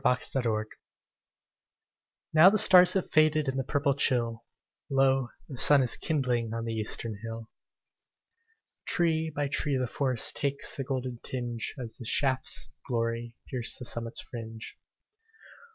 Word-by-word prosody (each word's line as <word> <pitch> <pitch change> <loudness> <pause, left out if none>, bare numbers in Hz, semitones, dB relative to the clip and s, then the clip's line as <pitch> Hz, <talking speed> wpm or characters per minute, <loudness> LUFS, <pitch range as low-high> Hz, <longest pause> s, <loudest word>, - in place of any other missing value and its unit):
At 125 0 +2
Sunrise 115 -5 0 1.7
Now 160 +4 +8
the 215 - +1
stars 185 -3 +7
have 190 - -2
faded 155 -1 +3
In 135 - -1
the 135 - -1
purple 140 +2 0
chill, 120 -5 0 0.5
Lo, 135 -1 +2 0.2
the 130 -5 -8
sun 145 -2 +5
is 125 - +4
kindling 120 -7 -1
On 115 0 -4
the 115 - -3
eastern 110 0 -4
hill. 115 0 -8 1.4
Tree 160 -2 +1
by 145 -1 -2
tree 140 0 -1
the 130 - 0
forest 130 -1 0
Takes 140 -1 -1
the 135 - -3
golden 130 -2 -4
tinge, 120 -3 -5
As 120 -4 -8
the 120 - -9
shafts 130 +2 0
of 130 - -35
glory 115 -1 -2
Pierce 125 -2 -1
the 125 - -8
summit's 115 0 -3
fringe. 115 -2 -9
130 Hz, 145 wpm, -28 LUFS, 115-140 Hz, 1.7 s, Now